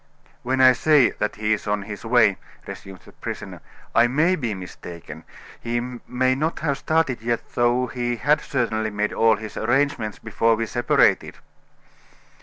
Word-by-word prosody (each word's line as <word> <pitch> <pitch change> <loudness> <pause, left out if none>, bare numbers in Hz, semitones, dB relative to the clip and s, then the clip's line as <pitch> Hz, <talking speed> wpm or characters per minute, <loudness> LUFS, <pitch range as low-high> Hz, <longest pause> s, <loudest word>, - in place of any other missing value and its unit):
"When 130 +2 0
I 130 0 +8
say 140 +1 +4
that 105 - -3
he 110 0 0
is 105 - -4
on 105 -1 -1
his 105 0 -8
way," 115 -4 +3 0.3
resumed 95 -1 -10
the - - -15
prisoner, - - -7 0.3
"I 120 - +5
may 155 +9 +2
be 120 - -3
mistaken. 90 -2 -10 0.3
He 120 0 -2
may 125 +1 -1
not 155 +5 -2
have 145 -3 -1
started 155 -7 0
yet, 115 0 -3
though 120 +1 +2
he 120 -1 -3
had 150 +6 +2
certainly 110 -4 -1
made 105 0 -2
all 115 -1 +4
his 105 0 -9
arrangements 120 -3 0
before 115 0 +1
we 115 +1 -2
separated." 120 +2 +1
120 Hz, 160 wpm, -23 LUFS, 110-130 Hz, 0.3 s, I